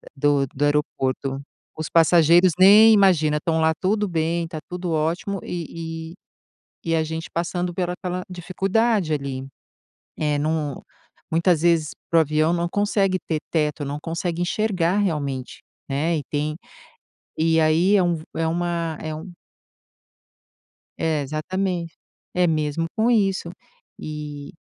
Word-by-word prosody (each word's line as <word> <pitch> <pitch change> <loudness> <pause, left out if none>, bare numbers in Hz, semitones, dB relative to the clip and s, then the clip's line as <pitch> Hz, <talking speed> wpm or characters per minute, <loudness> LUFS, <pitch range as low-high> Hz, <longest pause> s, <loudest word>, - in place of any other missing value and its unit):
do 140 -1 +2
do 135 +3 -2
aeroporto. 135 -2 -1 0.4
Os 155 0 -3
passageiros 170 +1 +5
nem 210 +4 +8
imagina, 165 -7 +4
estão 160 +1 0
lá, 160 0 +3
tudo 205 +2 +1
bem, 165 -1 -1
tá 160 -1 -7
tudo 180 -1 -4
ótimo 165 +5 -1
e 165 -1 -6 0.7
e - - -3
e - - +3
a 160 - +2
gente 160 +1 -5
passando 175 +1 -2
pela 180 0 -2
aquela 180 0 -4
dificuldade 190 +1 0
ali. 135 -2 -4 0.7
Eh, 150 -1 0
num 150 -2 -1 0.5
muitas 170 0 +2
vezes, 165 -3 +3 0.2
para 165 - +4
o - - +7
avião 155 +2 +1
não 175 0 0
consegue 200 -1 +1
ter 160 -2 -1
teto, 150 -2 0
não 145 +1 -4
consegue 170 +1 -3
enxergar 185 -1 0
realmente, 145 -9 -2 0.3
né, 155 +4 0
e - - -4
tem 150 +1 -1 0.8
e 160 +1 +3
aí 165 +5 +4
é 190 - +3
um 175 -1 +1
v 155 - -8
é 165 - 0
uma 170 -1 -2
é 155 -1 -4
um 175 +4 -8 1.7
É, 160 -2 0
exatamente. 170 +4 -3 0.4
É 180 0 +3
mesmo 155 0 0
com 225 +2 +2
isso. 195 -6 +1 0.5
E, 150 0 -7
165 Hz, 140 wpm, -23 LUFS, 155-180 Hz, 1.7 s, nem